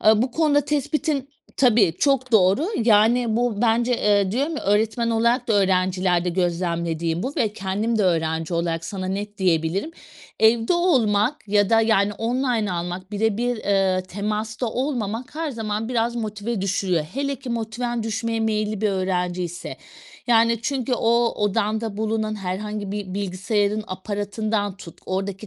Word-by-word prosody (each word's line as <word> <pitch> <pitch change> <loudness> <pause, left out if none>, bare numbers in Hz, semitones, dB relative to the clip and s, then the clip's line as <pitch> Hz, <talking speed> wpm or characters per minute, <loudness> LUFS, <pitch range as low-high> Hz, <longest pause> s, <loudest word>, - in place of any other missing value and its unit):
Aaa, 215 +1 +5
bu 255 - -1
konuda 295 0 +3
tespitin 290 -1 -1 0.3
Tabii, 225 -9 +4
çok 260 -3 +1
doğru. 200 - +4 0.2
Yani 225 +1 +4
bu 235 -3 0
bence, 235 +1 +2
eee, 200 -2 +2
diyorum 285 +7 -1
ya, - - -4
öğretmen 220 +3 +1
olarak 235 +2 +1
da - - +3
öğrencilerde 185 -2 +2
gözlemlediğim 170 -1 -1
bu 265 - -3
ve 215 -3 +1
kendim 210 +4 -1
de - - +3
öğrenci 160 -1 0
olarak 165 -1 -1
sana 185 +2 -4
net 205 +2 -4
diyebilirim. 180 - 0 0.5
Evde 225 +4 +4
olmak 255 - +2
ya 205 0 +3
da 225 0 +5
yani 210 -2 +2
online 230 -1 -1
almak 180 +2 -4
bire 210 0 +1
bir, 245 +1 0
eee, 195 -3 +1
temasta 215 +4 -3
olmamak 245 -1 -3
her 320 0 -2
zaman 220 -2 -3
biraz 235 -1 0
motive 215 -1 -3
düşürüyor. 185 -4 0
Hele 280 +1 -1
ki 260 -1 -8
motiven 235 +1 -2
düşmeye 225 +1 -2
meyilli 215 -1 -1
bir 215 - +2
öğrenciyse 180 -2 -2 0.5
yani 230 -1 +4
çünkü 260 0 -2
o 235 0 +2
odanda 215 +1 -1
bulunan 220 0 -1
herhangi 205 +1 -4
bir 200 -3 -5
bilgisayarın 205 +2 -1
aparatından 205 +1 -3
tut, 170 -4 -12
oradaki 195 +2 -3
215 Hz, 145 wpm, -23 LUFS, 190-235 Hz, 0.5 s, Aaa